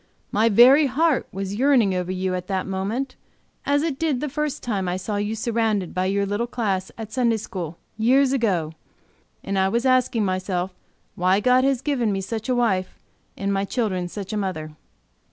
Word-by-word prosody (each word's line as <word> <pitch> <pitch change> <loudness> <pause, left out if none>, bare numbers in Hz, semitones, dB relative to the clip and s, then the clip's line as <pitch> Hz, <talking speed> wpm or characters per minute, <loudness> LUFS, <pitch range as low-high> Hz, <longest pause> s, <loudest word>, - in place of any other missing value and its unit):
My 220 +3 +3
very 260 +7 +7
heart 300 +2 +1
was 195 +1 -4
yearning 240 -4 +3
over 180 0 -2
you 185 0 -1
at 180 0 -4
that 190 -2 -1
moment, 210 +8 -3 0.5
as 285 +1 +2
it 300 -4 -2
did 310 -6 0
the 300 +2 -3
first 300 +1 -3
time 195 -6 -1
I 180 - -1
saw 205 +3 -3
you 205 +2 -1
surrounded 220 -5 -1
by 185 0 0
your 200 +1 +1
little 205 +4 -1
class 200 -6 -2
at 220 -1 -7
Sunday 235 -3 +2
school, 175 -6 -6 0.2
years 260 +4 +4
ago, 185 - 0 0.7
and 195 0 -1
I 190 0 +3
was 235 +4 0
asking 255 -4 +2
myself 185 -1 -2 0.4
why 185 +2 +2
God 250 +4 +4
had 270 -2 +1
given 250 -7 0
me 195 - -1
such 220 +4 -5
a 250 - +2
wife, 190 -7 0 0.4
and 200 0 -1
my 195 0 0
children 195 -5 -1
such 200 +3 -6
a - - -1
mother." 180 -6 -3
210 Hz, 190 wpm, -23 LUFS, 190-250 Hz, 0.7 s, very